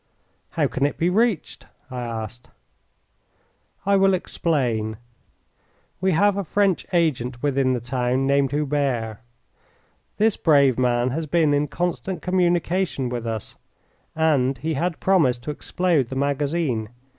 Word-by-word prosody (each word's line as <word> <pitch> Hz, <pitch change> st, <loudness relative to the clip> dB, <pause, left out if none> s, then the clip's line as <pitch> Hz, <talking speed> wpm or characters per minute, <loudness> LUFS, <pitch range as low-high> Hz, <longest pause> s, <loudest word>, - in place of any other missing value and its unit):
"How -, -, +3 dB
can 135 Hz, -, -2 dB
it 145 Hz, -, -6 dB
be 170 Hz, +2 st, +1 dB
reached?" 220 Hz, -2 st, 0 dB, 0.2 s
I 125 Hz, -1 st, -4 dB
asked. 115 Hz, 0 st, -6 dB, 1.4 s
"I 200 Hz, 0 st, +3 dB
will 195 Hz, 0 st, +4 dB
explain. 120 Hz, -, -1 dB, 1.0 s
We 190 Hz, -1 st, +2 dB
have 200 Hz, +4 st, +3 dB
a 200 Hz, -, -1 dB
French 195 Hz, +1 st, +1 dB
agent 130 Hz, -8 st, 0 dB
within 135 Hz, -2 st, +2 dB
the 125 Hz, -, -1 dB
town 125 Hz, +2 st, -1 dB
named 140 Hz, 0 st, +2 dB
Hubert. 135 Hz, -6 st, -1 dB, 1.0 s
This 220 Hz, 0 st, +2 dB
brave 140 Hz, -6 st, +4 dB
man 125 Hz, 0 st, +1 dB
has 155 Hz, +3 st, -3 dB
been 155 Hz, -2 st, +2 dB
in 145 Hz, +1 st, +1 dB
constant 175 Hz, +4 st, -3 dB
communication 175 Hz, -5 st, 0 dB
with 120 Hz, -1 st, -4 dB
us, 110 Hz, -2 st, -5 dB, 0.6 s
and 140 Hz, -5 st, +2 dB
he 160 Hz, +6 st, -2 dB
had 165 Hz, +3 st, -2 dB
promised 135 Hz, -11 st, +2 dB
to 150 Hz, -, -3 dB
explode 160 Hz, -4 st, 0 dB
the 130 Hz, -, -5 dB
magazine. 140 Hz, -4 st, -1 dB
145 Hz, 135 wpm, -23 LUFS, 125-175 Hz, 1.4 s, will